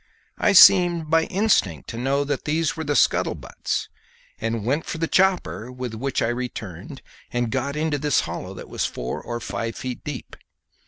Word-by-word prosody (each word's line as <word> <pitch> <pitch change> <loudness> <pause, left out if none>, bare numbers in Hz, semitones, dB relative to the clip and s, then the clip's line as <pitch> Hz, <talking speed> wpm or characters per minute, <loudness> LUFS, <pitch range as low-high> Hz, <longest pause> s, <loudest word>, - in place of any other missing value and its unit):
I 205 - +3
seemed 175 -5 +7
by 165 0 +4
instinct 185 - +1
to 115 - -7
know 135 +3 +1
that 145 -1 -3
these 160 +1 0
were 160 - -4
the 145 -1 -1
scuttlebutts - - 0 0.5
and 115 -1 -2
went 145 +6 0
for - - -4
the 165 0 -1
chopper, 185 - +1
with 125 -2 -5
which 130 +4 -1
I - - +1
returned 120 - -6 0.3
and 120 -2 -1
got 140 +2 -2
into 155 -1 0
this 145 -1 +2
hollow, - - -6
that - - -9
was - - -3
four - - -3
or 120 0 -5
five 115 0 -4
feet 125 -2 -6
deep. 145 -4 -7
135 Hz, 175 wpm, -23 LUFS, 120-160 Hz, 0.5 s, seemed